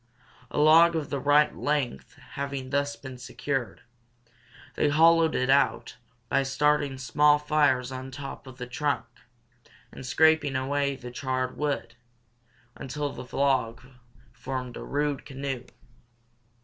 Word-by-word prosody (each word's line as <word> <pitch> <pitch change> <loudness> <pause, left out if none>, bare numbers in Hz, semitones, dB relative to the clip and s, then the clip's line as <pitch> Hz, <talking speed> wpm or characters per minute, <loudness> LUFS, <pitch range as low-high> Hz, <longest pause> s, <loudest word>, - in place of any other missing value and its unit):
A - - -6
log 165 +3 +6
of 155 -3 -3
the 140 - -1
right 145 +2 +3
length 145 -4 -2 0.2
having 140 -2 -5
thus 140 0 0
been 130 -2 -10
secured, 135 -1 -4 0.9
they 150 - +1
hollowed 165 +2 +4
it 130 - +1
out 140 +1 +1 0.3
by 135 - +2
starting 145 0 +1
small 145 +4 +3
fires 145 -4 +1
on 130 0 -6
top 135 0 -8
of 130 -1 -11
the 125 - -5
trunk, 140 +4 -2 0.9
and - - -10
scraping 155 +1 +3
away 140 +1 0
the 125 -1 -9
charred 130 0 -2
wood, 145 -6 -2 0.8
until 145 +2 -4
the 125 0 -9
log 130 -5 +1 0.5
formed 125 0 -5
a - - -7
rude 145 -1 -2
canoe. 135 -2 -5
140 Hz, 130 wpm, -27 LUFS, 130-150 Hz, 0.9 s, log